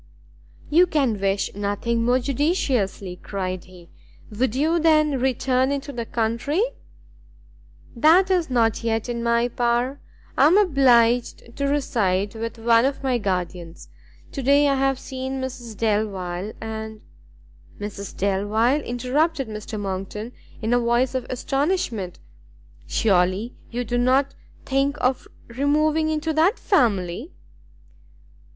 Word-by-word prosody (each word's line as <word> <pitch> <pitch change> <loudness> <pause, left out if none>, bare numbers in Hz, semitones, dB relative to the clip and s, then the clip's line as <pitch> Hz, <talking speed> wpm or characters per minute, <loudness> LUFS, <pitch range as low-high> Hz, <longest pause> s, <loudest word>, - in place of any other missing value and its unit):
"You 350 +4 +5
can 270 - 0
wish 195 0 0
nothing 205 +3 -1
more 245 +2 +3
judiciously," 250 - -1
cried 185 -2 -4
he; 180 -2 -15 0.4
"would 225 +2 -1
you, 320 +5 +2
then, 305 -4 +3
return 260 +1 +1
into 280 0 -4
the 235 -2 -5
country?" 235 - 0 1.3
"That 340 +9 +5
is 355 -5 +1
not 230 -3 +1
yet 225 0 -1
in 235 -1 -3
my 235 0 +2
power; 245 +3 0 0.4
I 275 - +5
am 350 +6 +5
obliged 245 - +3
to 280 - -1
reside 205 -9 0
with 230 +1 -5
one 230 0 +4
of 275 0 -2
my 255 -2 +1
guardians. 175 - -4 0.4
To 275 - -4
day 280 +2 +4
I 280 - +3
have 270 0 +1
seen 265 0 -5
Mrs 240 -4 -6
Delvile, 205 -3 -1
and 220 -1 -6 0.4
" - - -27
"Mrs 205 -1 -7
Delvile?" 210 +8 +1
interrupted 270 +4 -1
Mr 215 0 -6
Monckton, 200 +3 -5 0.3
in 225 +2 +1
a 245 - +4
voice 240 +2 +1
of 260 -2 -3
astonishment. 255 - -1 0.7
"Surely 195 +3 +1 0.2
you 245 +1 -3
do 245 +1 -1
not 265 +3 +2 0.3
think 275 +2 0
of 255 0 0 0.2
removing 300 +5 +1
into 315 +1 -1
that 335 +9 +3
family?" 200 - +1
240 Hz, 130 wpm, -23 LUFS, 210-275 Hz, 1.3 s, You